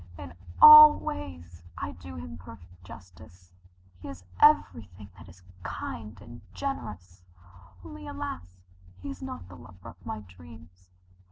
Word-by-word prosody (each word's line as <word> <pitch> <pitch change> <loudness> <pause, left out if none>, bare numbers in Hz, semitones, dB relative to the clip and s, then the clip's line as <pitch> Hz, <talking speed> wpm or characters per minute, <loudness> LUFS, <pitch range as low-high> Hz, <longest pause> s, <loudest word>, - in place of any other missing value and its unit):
In 90 -4 -11 0.3
all 305 0 +10
ways 85 -3 -9 0.2
I - - -6
do 85 +1 -12
him 80 -1 -9
perfect 90 +1 -16
justice. 90 -1 -16 0.5
He - - -11
is 90 -1 -11 0.2
everything 105 - +1
that - - -16
is 90 +1 -19 0.2
kind 105 +1 -8
and 120 +3 -14
generous 95 - -7 0.6
only, 100 +2 -11
alas, 90 -1 -8 0.5
he 95 - -6
is 90 - -11
not 85 +1 -9
the 90 - -14
lover 90 +1 -15
of 90 +2 -18
my 110 +2 -7
dreams. 90 -1 -17
90 Hz, 140 wpm, -26 LUFS, 85-100 Hz, 0.6 s, all